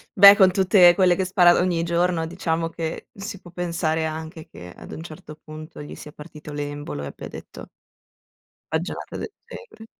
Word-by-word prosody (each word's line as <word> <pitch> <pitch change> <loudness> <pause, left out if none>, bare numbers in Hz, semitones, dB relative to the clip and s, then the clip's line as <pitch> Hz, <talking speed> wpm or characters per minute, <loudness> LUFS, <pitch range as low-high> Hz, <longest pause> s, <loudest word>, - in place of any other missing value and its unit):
Beh, 200 0 +10
con 190 -2 +6
tutte 185 -2 +5
quelle 185 -2 +4
che 190 - -1
spara 180 -2 +5
ogni 175 -2 0
giorno, 170 0 0
diciamo 165 -1 -2
che, 165 -1 -6
si 200 -1 -8
può 175 - -14
pensare 165 -2 -2
anche 160 +1 -7
che 90 0 -12
ad - - -13
un - - -7
certo 155 -2 -11
punto 155 0 -10
gli 145 - -9
sia 150 - -11
partito 150 -1 -11
l'embolo 145 - -5
e - - -5
abbia - - -9
detto - - -11 1.0
baggianata 160 +4 -4
del - - -6 0.2
genere. 425 - -12
170 Hz, 175 wpm, -23 LUFS, 155-180 Hz, 1.0 s, Beh